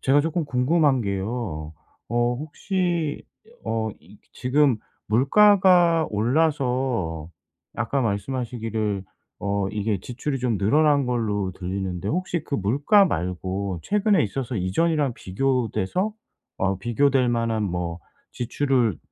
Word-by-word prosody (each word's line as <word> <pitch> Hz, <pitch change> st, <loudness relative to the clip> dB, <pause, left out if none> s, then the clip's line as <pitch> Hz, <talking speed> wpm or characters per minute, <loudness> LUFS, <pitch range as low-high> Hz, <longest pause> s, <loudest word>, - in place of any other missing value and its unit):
제가 140 Hz, +2 st, +4 dB
조금 165 Hz, +2 st, -1 dB
궁금한 140 Hz, +1 st, +2 dB
게요. 100 Hz, -6 st, -3 dB, 0.4 s
어 120 Hz, +1 st, +1 dB
혹시 165 Hz, +2 st, -2 dB, 0.4 s
어 110 Hz, -1 st, -1 dB
이 95 Hz, +6 st, -18 dB
지금 135 Hz, -1 st, +2 dB, 0.3 s
물가가 175 Hz, -, +5 dB
올라서 125 Hz, -, 0 dB, 0.5 s
아까 120 Hz, +5 st, 0 dB
말씀하시기를 110 Hz, -3 st, -2 dB, 0.3 s
어 100 Hz, -1 st, -1 dB
이게 105 Hz, -2 st, -1 dB
지출이 130 Hz, +6 st, -4 dB
좀 120 Hz, -5 st, 0 dB
늘어난 145 Hz, +6 st, +3 dB
걸로 105 Hz, -6 st, -1 dB
들리는데 95 Hz, 0 st, -4 dB
혹시 175 Hz, +1 st, -1 dB
그 140 Hz, -, -4 dB
물가 145 Hz, -, +4 dB
말고 95 Hz, -, -2 dB
최근에 210 Hz, -1 st, +2 dB
있어서 120 Hz, +3 st, -4 dB
이전이랑 140 Hz, -, +1 dB
비교돼서 130 Hz, -, -1 dB, 0.4 s
어 95 Hz, -1 st, 0 dB
비교될 125 Hz, +4 st, +2 dB
만한 115 Hz, -2 st, 0 dB
뭐 90 Hz, -3 st, -3 dB, 0.3 s
지출을 125 Hz, -, 0 dB
120 Hz, 240 characters per minute, -24 LUFS, 100-145 Hz, 0.5 s, 물가가